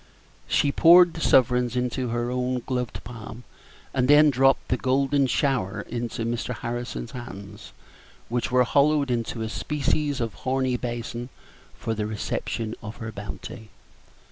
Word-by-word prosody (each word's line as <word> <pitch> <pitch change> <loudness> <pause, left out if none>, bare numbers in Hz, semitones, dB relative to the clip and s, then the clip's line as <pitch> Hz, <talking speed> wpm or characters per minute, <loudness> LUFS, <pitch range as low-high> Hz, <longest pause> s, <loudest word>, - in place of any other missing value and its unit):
She 140 - +2
poured 170 +3 +7
the 165 - -7
sovereigns 125 -2 +3
into 125 +1 -1
her 120 +1 -2
own 125 -1 -1
gloved 125 -3 -3
palm, 115 0 -9 0.5
and 125 -1 +1
then 150 +1 +7
dropped 135 +1 +3
the - - +3
golden 135 +1 +2
shower 120 -6 0
into 115 0 -4
Mr. 120 0 -3
Harrison's 120 +1 -5
hands, 105 -5 -9 0.6
which 120 +1 -1
were 125 0 +4
hollowed 140 +2 +2
into 115 -1 -2
a - - -2
species 145 +2 -1
of 115 -3 -2
horny 130 -1 -1
basin 120 0 -4 0.5
for 115 -2 -2
the 105 -1 -2
reception 110 +1 -3
of 105 +1 -7
her 110 -1 -6
bounty. 105 +2 -8
125 Hz, 140 wpm, -25 LUFS, 115-135 Hz, 0.6 s, poured